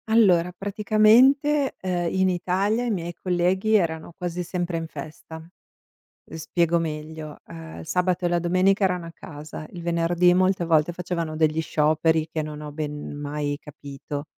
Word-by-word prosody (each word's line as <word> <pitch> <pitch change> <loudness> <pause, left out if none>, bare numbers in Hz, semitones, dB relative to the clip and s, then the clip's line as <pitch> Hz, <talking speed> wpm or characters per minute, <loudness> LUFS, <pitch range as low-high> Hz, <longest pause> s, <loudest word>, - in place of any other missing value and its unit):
Allora, 185 -6 +4
praticamente, 220 +9 +3
uhm, 180 -2 -1
in 190 0 +2
Italia, 195 +6 0
i - - -1
miei 175 -4 -3
colleghi 185 +5 +1
erano 165 -4 0
quasi 180 -1 -3
sempre 175 -1 -3
in 165 0 -4
festa. 155 +1 -9
Uhm, 165 +2 -18 0.7
spiego 170 +1 +1
meglio: 155 -1 -5
uhm, 80 0 -9
il 80 - -9
sabato 180 0 0
e - - +2
la 175 - +2
domenica 185 +4 +2
erano 180 -3 0
a - - -9
casa, 155 -1 -9
il 175 - -8
venerdì 170 +1 +2
molte 185 0 +2
volte 160 0 +3
facevano 170 -2 -3
degli 155 0 +2
scioperi 155 +1 +1
che 160 - -1
non 150 0 -7
ho 150 -1 -7
ben 150 -1 -5
mai 145 0 -3
capito. 145 0 -8
170 Hz, 160 wpm, -24 LUFS, 155-185 Hz, 0.7 s, Allora